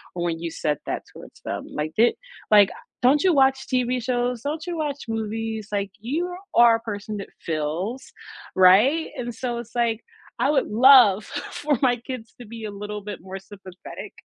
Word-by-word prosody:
or 175 Hz, -, -2 dB
when 165 Hz, -1 st, -2 dB
you 170 Hz, 0 st, -4 dB
said 150 Hz, -2 st, -1 dB
that -, -, -3 dB
towards -, -, -14 dB
them? -, -, -4 dB
Like, 150 Hz, +1 st, -3 dB
di 235 Hz, +2 st, +5 dB, 0.4 s
like, 205 Hz, -2 st, +7 dB
a -, -, -8 dB, 0.3 s
don't 275 Hz, +4 st, +4 dB
you 375 Hz, -, +5 dB
watch 265 Hz, -2 st, +3 dB
TV 250 Hz, 0 st, +1 dB
shows, 245 Hz, 0 st, -1 dB
don't 305 Hz, +4 st, -4 dB
you 350 Hz, -1 st, -4 dB
watch 295 Hz, -3 st, -2 dB
movies? 225 Hz, -1 st, -3 dB
Like, 200 Hz, -1 st, -2 dB
you 320 Hz, +11 st, -2 dB, 0.2 s
are 235 Hz, -1 st, +7 dB
a -, -, -13 dB
person 210 Hz, -2 st, -5 dB
that 200 Hz, -, -6 dB, 0.2 s
feels, 165 Hz, -, -2 dB, 0.5 s
right?" 210 Hz, -, +5 dB
And 240 Hz, -1 st, -4 dB
so, 245 Hz, -2 st, -3 dB
it's 235 Hz, 0 st, -10 dB
like, 235 Hz, -2 st, +1 dB, 0.4 s
I -, -, +2 dB
would 275 Hz, -3 st, +1 dB
love 225 Hz, -3 st, +6 dB
for 290 Hz, 0 st, -2 dB
my 250 Hz, -3 st, +4 dB
kids 235 Hz, -2 st, -8 dB
to 245 Hz, -, -9 dB
be 225 Hz, +1 st, -9 dB
a -, -, -4 dB
little 210 Hz, +1 st, -6 dB
bit 205 Hz, 0 st, -6 dB
more 190 Hz, +2 st, -7 dB
sympathetic, 190 Hz, -2 st, -11 dB
225 Hz, 190 wpm, -24 LUFS, 200-260 Hz, 0.5 s, like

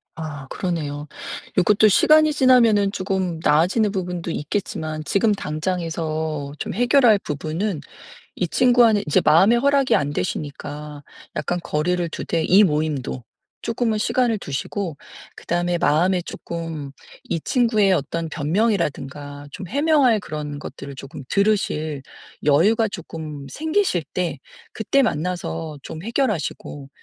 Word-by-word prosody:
아. 145 Hz, -4 st, -7 dB
그러네요. 150 Hz, -5 st, -3 dB, 0.5 s
요것도 210 Hz, +3 st, +5 dB
시간이 310 Hz, +8 st, +5 dB
지나면은 230 Hz, -7 st, +4 dB
조금 185 Hz, -3 st, -2 dB
나아지는 185 Hz, +8 st, +3 dB
부분도 180 Hz, -3 st, -3 dB
있겠지만 155 Hz, -2 st, -3 dB
지금 210 Hz, +2 st, +2 dB
당장에서 160 Hz, -4 st, -3 dB
좀 -, -, -4 dB
해결할 245 Hz, -3 st, +5 dB
부분은 155 Hz, +4 st, -3 dB, 0.5 s
이 180 Hz, -, -1 dB
친구와는 240 Hz, -2 st, +4 dB
이제 150 Hz, -, +3 dB
마음의 190 Hz, +10 st, +5 dB
허락이 280 Hz, 0 st, +3 dB
안 145 Hz, 0 st, 0 dB
되시니까 145 Hz, +6 st, -5 dB, 0.3 s
약간 175 Hz, 0 st, -1 dB
거리를 175 Hz, +3 st, 0 dB
두되 165 Hz, +1 st, -2 dB
이 195 Hz, +6 st, +6 dB
모임도 150 Hz, -, -1 dB, 0.4 s
조금은 230 Hz, -1 st, -1 dB
시간을 230 Hz, 0 st, +1 dB
두시고 160 Hz, +2 st, -4 dB, 0.4 s
그다음에 175 Hz, 0 st, -1 dB
마음에 175 Hz, +4 st, +2 dB
조금 165 Hz, -5 st, -6 dB, 0.3 s
이 165 Hz, -, -2 dB
친구의 215 Hz, -, +2 dB
어떤 165 Hz, +2 st, -2 dB
변명이라든가 145 Hz, -, -2 dB
좀 185 Hz, +5 st, -7 dB
해명할 280 Hz, -4 st, +3 dB
그런 150 Hz, -4 st, -6 dB
것들을 140 Hz, -2 st, -8 dB
조금 140 Hz, +1 st, -9 dB
들으실 175 Hz, -8 st, 0 dB, 0.4 s
여유가 205 Hz, +10 st, +3 dB
조금 155 Hz, -6 st, -7 dB
생기실 315 Hz, -, 0 dB
때 175 Hz, -5 st, -1 dB, 0.4 s
그때 250 Hz, +5 st, +2 dB
만나서 165 Hz, -, -2 dB
좀 160 Hz, +4 st, -8 dB
해결하시고 205 Hz, -, -2 dB
175 Hz, 300 characters per minute, -22 LUFS, 150-215 Hz, 0.5 s, 이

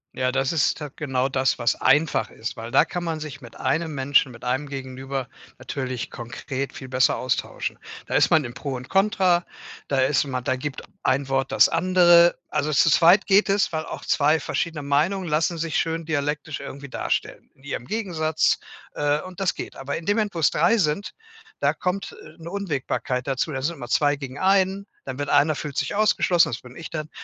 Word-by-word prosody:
Ja, 130 Hz, 0 st, 0 dB
das 135 Hz, +1 st, 0 dB
ist 160 Hz, -1 st, +1 dB
da 150 Hz, -, -5 dB
genau 135 Hz, -3 st, -1 dB
das, 130 Hz, -1 st, +1 dB
was 120 Hz, 0 st, +2 dB
einfach 150 Hz, -8 st, +2 dB
ist, 115 Hz, +2 st, -6 dB
weil 115 Hz, +1 st, -7 dB
da 135 Hz, -, +6 dB
kann 175 Hz, -1 st, -4 dB
man 165 Hz, -2 st, -2 dB
sich 150 Hz, -2 st, -7 dB
mit 120 Hz, -2 st, -12 dB
1 160 Hz, +5 st, 0 dB
Menschen, 135 Hz, -1 st, +2 dB
mit 120 Hz, -1 st, -13 dB
1 130 Hz, +4 st, -1 dB
Gegenüber 135 Hz, -1 st, -5 dB, 0.3 s
natürlich 130 Hz, -3 st, -4 dB
konkret 130 Hz, +3 st, -5 dB
viel 130 Hz, -, -9 dB
besser 130 Hz, 0 st, +3 dB
austauschen. 130 Hz, -1 st, -2 dB, 0.3 s
Da -, -, -2 dB
ist -, -, +4 dB
man 160 Hz, -2 st, +5 dB
im 120 Hz, -1 st, -7 dB
Pro 140 Hz, +1 st, -4 dB
und 125 Hz, 0 st, -8 dB
Kontra, 190 Hz, -3 st, +3 dB, 0.4 s
da 140 Hz, -, 0 dB
ist 135 Hz, +1 st, +3 dB
man 130 Hz, -3 st, -3 dB
da 130 Hz, -, 0 dB
gibt 135 Hz, +2 st, -5 dB, 0.2 s
ein 135 Hz, +1 st, +1 dB
Wort 135 Hz, 0 st, 0 dB
das -, -, +6 dB
andere. 175 Hz, -1 st, +5 dB
Also 150 Hz, +2 st, -1 dB
zu 155 Hz, -, +5 dB
zweit 175 Hz, +5 st, +5 dB
geht 200 Hz, +1 st, +4 dB
es, 200 Hz, +1 st, +2 dB
weil 160 Hz, -1 st, -2 dB
auch -, -, -7 dB
2 150 Hz, +2 st, +3 dB
verschiedene 165 Hz, -2 st, -2 dB
Meinungen 155 Hz, +7 st, +1 dB
lassen 160 Hz, +2 st, +1 dB
sich 165 Hz, -1 st, -1 dB
schön 165 Hz, 0 st, -1 dB
dialektisch 150 Hz, -1 st, -2 dB
irgendwie 140 Hz, +1 st, -8 dB
darstellen -, -, -3 dB
in -, -, -27 dB
ihrem 140 Hz, -4 st, -5 dB
Gegensatz, 160 Hz, -, 0 dB, 0.4 s
äh, 145 Hz, 0 st, +1 dB
und 185 Hz, 0 st, -10 dB
das 190 Hz, -5 st, +1 dB
geht. -, -, -7 dB
Aber 135 Hz, +1 st, -4 dB
in 165 Hz, -, -9 dB
dem 205 Hz, +2 st, +2 dB
Moment, 210 Hz, -2 st, 0 dB
wo's 165 Hz, -3 st, +3 dB
3 175 Hz, +9 st, +3 dB
sind, 185 Hz, +1 st, 0 dB, 0.5 s
da -, -, +2 dB
kommt, 190 Hz, +1 st, -3 dB
äh, 155 Hz, -, -14 dB
'ne 165 Hz, +1 st, -8 dB
Unwägbarkeit 145 Hz, -8 st, -2 dB
dazu. 135 Hz, +3 st, -1 dB
Da 130 Hz, -2 st, -3 dB
sind 165 Hz, +5 st, -1 dB
immer 125 Hz, -5 st, -8 dB
2 145 Hz, -1 st, +3 dB
gegen 135 Hz, -2 st, -8 dB
1, 195 Hz, +1 st, +2 dB, 0.2 s
dann 130 Hz, 0 st, -6 dB
wird 145 Hz, -, -2 dB
einer 155 Hz, +2 st, +4 dB
fühlt 145 Hz, -1 st, -6 dB
sich -, -, -1 dB
ausgeschlossen 200 Hz, -4 st, +3 dB
das 115 Hz, -, -4 dB
bin 125 Hz, 0 st, -14 dB
ich 160 Hz, -, -8 dB
dann. 155 Hz, -1 st, -5 dB
150 Hz, 205 wpm, -24 LUFS, 130-170 Hz, 0.5 s, da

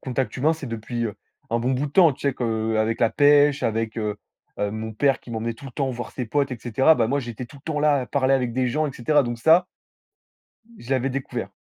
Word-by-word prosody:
Contact 130 Hz, 0 st, -3 dB
humain 150 Hz, +5 st, +2 dB
c'est 155 Hz, -4 st, -7 dB
depuis, 115 Hz, +1 st, -4 dB
heu, 105 Hz, -, -6 dB, 0.4 s
un 115 Hz, -, +1 dB
bon 125 Hz, +3 st, 0 dB
bout 135 Hz, +3 st, -1 dB
de 140 Hz, -, -8 dB
temps, 170 Hz, -6 st, +6 dB
tu 140 Hz, +2 st, -2 dB
sais 135 Hz, -, -1 dB
qu'avec 110 Hz, -2 st, -1 dB
la 115 Hz, -2 st, +3 dB
pêche, 145 Hz, +2 st, +4 dB
avec, 115 Hz, 0 st, -1 dB
heu 105 Hz, -2 st, -2 dB, 0.4 s
heu, 105 Hz, 0 st, 0 dB
mon 110 Hz, +1 st, -5 dB
père 135 Hz, +5 st, +1 dB
qui 120 Hz, -, -13 dB
m'emmenait 115 Hz, 0 st, -3 dB
tout 140 Hz, -, -15 dB
le 135 Hz, -, -8 dB
temps 135 Hz, 0 st, -1 dB
voir 120 Hz, -1 st, -6 dB
ses 125 Hz, -, -4 dB
potes 140 Hz, +2 st, 0 dB
et 120 Hz, -, -6 dB
cetera. 130 Hz, +7 st, +4 dB
Bah 115 Hz, -6 st, +1 dB
moi, 140 Hz, +3 st, +1 dB
j'étais 120 Hz, 0 st, -6 dB
tout 145 Hz, -, -15 dB
le 135 Hz, -, -17 dB
temps 150 Hz, -, -1 dB
là 150 Hz, -2 st, +3 dB
à -, -, -7 dB
parler 135 Hz, -1 st, +2 dB
avec 125 Hz, -3 st, 0 dB
des 130 Hz, 0 st, 0 dB
gens 150 Hz, +5 st, 0 dB
et 140 Hz, -, -5 dB
cetera. 145 Hz, +5 st, +2 dB
Donc 120 Hz, -2 st, -4 dB
ça, 165 Hz, +7 st, +5 dB, 1.1 s
je 120 Hz, -, -13 dB
l'avais 135 Hz, +1 st, +1 dB
découvert. 125 Hz, -6 st, -4 dB
125 Hz, 255 wpm, -23 LUFS, 115-140 Hz, 1.1 s, temps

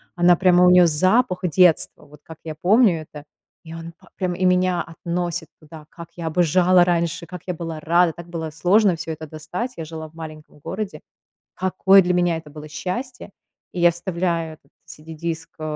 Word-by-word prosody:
она 175 Hz, -1 st, +5 dB
прямо, 180 Hz, 0 st, +4 dB
у -, -, +6 dB
нее 180 Hz, -1 st, +6 dB
запах 185 Hz, +5 st, +2 dB
детства, 175 Hz, -3 st, +2 dB
вот 150 Hz, 0 st, -17 dB
как 160 Hz, -1 st, -12 dB
я 155 Hz, -1 st, -6 dB
помню 185 Hz, +1 st, +3 dB
это, 150 Hz, -1 st, -11 dB, 0.4 s
и 165 Hz, -1 st, -10 dB
он 165 Hz, 0 st, -9 dB
па -, -, -21 dB
прямо 180 Hz, -2 st, -2 dB
и 185 Hz, -, 0 dB
меня 180 Hz, -1 st, +2 dB
относит 170 Hz, 0 st, -4 dB
туда, 155 Hz, -1 st, -13 dB
как 170 Hz, -1 st, -11 dB
я 170 Hz, -2 st, -5 dB
обожала 175 Hz, +2 st, +3 dB
раньше, 170 Hz, 0 st, -1 dB
как 180 Hz, 0 st, -9 dB
я 180 Hz, -, -1 dB
была 165 Hz, -2 st, -6 dB
рада, 170 Hz, +2 st, +3 dB
так 170 Hz, +1 st, -11 dB
было 165 Hz, -2 st, -5 dB
сложно 185 Hz, +4 st, +3 dB
всё 165 Hz, 0 st, -6 dB
это 155 Hz, 0 st, -7 dB
достать. 170 Hz, -, -5 dB
Я 165 Hz, -, -5 dB
жила 160 Hz, 0 st, -8 dB
в 160 Hz, -, -26 dB
маленьком 155 Hz, -2 st, -10 dB
городе. 200 Hz, +1 st, -5 dB, 0.5 s
Какое 190 Hz, +1 st, +4 dB
для 180 Hz, -1 st, 0 dB
меня 175 Hz, -2 st, +1 dB
это 160 Hz, -2 st, -9 dB
было 150 Hz, +1 st, -10 dB
счастье. 185 Hz, -, -6 dB, 0.4 s
И 180 Hz, -, -4 dB
я 175 Hz, 0 st, +6 dB
вставляю 170 Hz, -2 st, -2 dB
этот 140 Hz, -2 st, -27 dB
CD-диск, 160 Hz, +1 st, -7 dB
э, 155 Hz, -, -9 dB
170 Hz, 190 wpm, -21 LUFS, 160-180 Hz, 0.5 s, у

